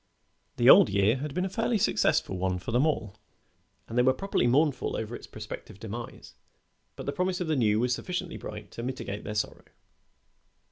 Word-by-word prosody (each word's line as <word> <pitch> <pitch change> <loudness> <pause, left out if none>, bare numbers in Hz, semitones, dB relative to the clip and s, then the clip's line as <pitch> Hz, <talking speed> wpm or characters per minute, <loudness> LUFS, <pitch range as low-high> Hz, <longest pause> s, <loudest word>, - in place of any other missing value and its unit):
The - - +3
old - - +9
year 100 +4 +3
had 145 +2 -5
been 180 +1 0
a - - 0
fairly 225 +4 0
successful 95 - +1
one 90 0 -1
for 90 - -6
them 125 +7 +3
all, 110 -9 -2 0.7
and 115 - -7
they 125 - +5
were 130 +1 +4
properly 195 -7 0
mournful 140 +1 +2
over 110 +2 -4
its - - -10
prospective 95 - -9
demise, 115 +2 -8 0.6
but - - -8
the 140 - -1
promise 180 0 -1
of 180 - -1
the 155 - +1
new 110 -5 +2
was 125 +1 +1
sufficiently 180 +5 -4
bright 105 -1 -8
to - - -7
mitigate 120 -5 -5
their 105 - -5
sorrow. 105 - -3
125 Hz, 190 wpm, -28 LUFS, 105-155 Hz, 0.7 s, old